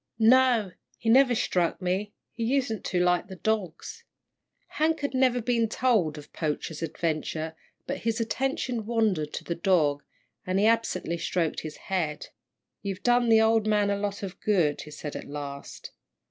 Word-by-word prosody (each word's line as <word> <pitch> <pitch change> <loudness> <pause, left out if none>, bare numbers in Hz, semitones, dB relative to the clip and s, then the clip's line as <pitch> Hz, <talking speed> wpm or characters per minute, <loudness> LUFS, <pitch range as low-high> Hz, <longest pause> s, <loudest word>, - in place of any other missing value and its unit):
"No, 235 -3 +4 0.3
he 225 - -2
never 250 +1 +6
struck 175 -5 0
me 190 +3 -1 0.2
he 230 - -5
usen't 235 -4 0
to 180 - 0
like 180 +2 +2
the 190 - -8
dogs." 220 - -3 0.6
Hank 315 +1 0
had 285 -1 -2
never 255 -1 +3
been 230 -2 +1
told 215 -12 +1
of 145 - -12
Poacher's 155 0 -3
adventure, 160 0 -2 0.3
but - - -3
his 225 +1 -1
attention 240 -1 -2
wandered 210 -10 +1
to - - -4
the 170 - -2
dog, 165 -5 +2 0.4
and 185 +1 -1
he 200 - +3
absently 215 -7 +1
stroked 165 -1 -1
his 155 -1 -7
head. 165 -6 -3 0.5
"You've 195 -2 -5
done 245 -1 +3
the 220 -1 +6
old 220 -1 +3
man 210 -1 +2
a - - +1
lot 200 +1 -3
of 190 -2 -6
good," 175 -9 +1
he 150 - -10
said 150 0 -7
at - - -6
last. 140 -1 -7
200 Hz, 165 wpm, -27 LUFS, 165-230 Hz, 0.6 s, never